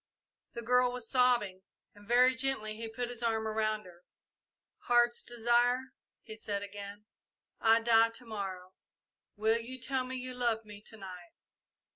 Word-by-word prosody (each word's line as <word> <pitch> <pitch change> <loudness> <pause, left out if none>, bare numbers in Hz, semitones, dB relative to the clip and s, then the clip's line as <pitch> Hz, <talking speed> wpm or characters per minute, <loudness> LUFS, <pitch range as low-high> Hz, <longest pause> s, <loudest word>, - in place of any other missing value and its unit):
The 235 - -6
girl 250 +1 +3
was 245 -2 -5
sobbing, 240 -7 +2 0.3
and 205 0 -17
very 250 +2 +5
gently 255 -4 -1
he 225 +1 -6
put 240 +2 -4
his 245 -1 -4
arm 225 -2 0
around 215 -1 -1
her. 175 -1 -15 0.8
"Heart's 240 0 +4
Desire," 240 +2 +1 0.3
he 220 - -9
said 205 -2 -4
again, 205 +1 -9 0.5
"I 225 +1 +5
die 225 0 +5
to 230 +2 -7
morrow 190 -4 -6 0.6
will 220 +2 +2
you 255 +3 -8
tell 260 +1 -1
me 255 +1 -5
you 255 0 -5
love 235 -3 -1
me 205 -1 -11
to 220 - -11
night?" 180 -3 -10
225 Hz, 155 wpm, -32 LUFS, 210-245 Hz, 0.8 s, very